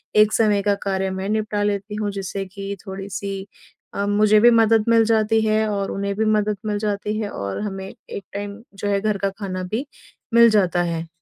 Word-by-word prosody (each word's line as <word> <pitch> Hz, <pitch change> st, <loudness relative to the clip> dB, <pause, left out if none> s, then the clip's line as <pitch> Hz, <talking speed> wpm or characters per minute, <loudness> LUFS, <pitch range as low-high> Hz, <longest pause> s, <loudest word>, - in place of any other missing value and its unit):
एक 215 Hz, 0 st, +5 dB
समय 210 Hz, -3 st, +3 dB
का 205 Hz, 0 st, +2 dB
कार्य 190 Hz, -1 st, -1 dB
मैं 190 Hz, +1 st, -4 dB
निपटा 215 Hz, -1 st, 0 dB
लेती 205 Hz, 0 st, -2 dB
हूँ। 210 Hz, -1 st, -2 dB
जिससे 195 Hz, 0 st, -4 dB
की 195 Hz, +1 st, -6 dB
थोड़ी-सी 195 Hz, 0 st, -5 dB, 0.5 s
अ, 200 Hz, -, -1 dB
मुझे 210 Hz, +1 st, +4 dB
भी 240 Hz, +3 st, +7 dB
मदद 225 Hz, -1 st, +4 dB
मिल 230 Hz, -1 st, +5 dB
जाती 220 Hz, 0 st, +2 dB
है 215 Hz, 0 st, +2 dB
और 200 Hz, -1 st, -2 dB
उन्हें 200 Hz, 0 st, -2 dB
भी 220 Hz, +2 st, 0 dB
मदद 210 Hz, -1 st, +1 dB
मिल 210 Hz, -1 st, -1 dB
जाती 210 Hz, 0 st, -2 dB
है। 210 Hz, -2 st, -2 dB
और 100 Hz, -1 st, -4 dB
हमें 195 Hz, -2 st, -4 dB, 0.2 s
एक 200 Hz, -, -6 dB
टाइम 205 Hz, +2 st, -5 dB
जो 205 Hz, +1 st, -4 dB
है 200 Hz, -1 st, +1 dB
घर 210 Hz, -1 st, 0 dB
का 195 Hz, 0 st, 0 dB
खाना 185 Hz, -3 st, -4 dB
भी 240 Hz, +7 st, -1 dB, 0.5 s
मिल 235 Hz, 0 st, +8 dB
जाता 185 Hz, -4 st, +2 dB
है। 165 Hz, -1 st, -3 dB
205 Hz, 205 wpm, -22 LUFS, 195-215 Hz, 0.5 s, मिल